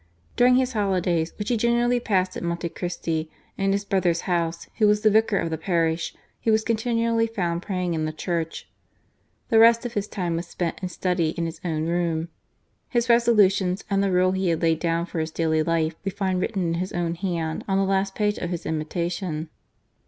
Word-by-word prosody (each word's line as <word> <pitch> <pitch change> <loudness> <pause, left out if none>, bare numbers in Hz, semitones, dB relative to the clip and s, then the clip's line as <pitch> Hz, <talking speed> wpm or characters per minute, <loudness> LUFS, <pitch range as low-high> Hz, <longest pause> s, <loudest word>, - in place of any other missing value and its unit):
During 250 +1 +5
his 255 0 +1
holidays, 180 -6 0
which 210 -1 -3
he 240 - +2
generally 240 +2 +2
passed 185 -5 0
at - - -5
Monte 170 0 -2
Christi, 165 -2 -3 0.3
in 195 0 0
his 200 +1 0
brother's 180 -4 +1
house, 170 -2 -1
who 215 - +5
was 210 0 +3
the 215 -1 +4
vicar 220 -1 +3
of 165 - -1
the 160 - -2
parish, 165 -1 0 0.2
he - - -1
was 220 0 +3
continually 230 0 +1
found 175 -6 -2
praying 180 -2 -2
in 155 -1 -1
the 155 - -2
church. 165 0 -3 0.8
The 225 - +5
rest 230 +1 +6
of 240 - -4
his 205 -2 -2
time 175 -6 -2
was 170 +1 -4
spent 175 -1 -3
in 185 - -3
study 180 -3 -1
in 170 - -1
his 165 0 -6
own 160 -3 -1
room. 170 -1 -1 0.6
His 240 -1 0
resolutions 205 -5 +4
and 195 0 +3
the 200 -1 +1
rule 185 0 +3
he 190 -1 0
had 165 0 0
laid 165 -1 +3
down 170 0 0
for 175 - -5
his 160 0 -1
daily 160 -1 +1
life 160 0 +1
we 195 - -1
find 190 -2 -1
written 195 -2 -1
in 165 - 0
his 185 +1 -3
own 170 -1 -1
hand 170 -3 -3
on 195 -1 +1
the 195 - +3
last 195 0 0
page 210 -1 0
of 175 - -3
his 175 -2 -4
Imitation. 160 +1 -3
180 Hz, 205 wpm, -24 LUFS, 165-205 Hz, 0.8 s, rest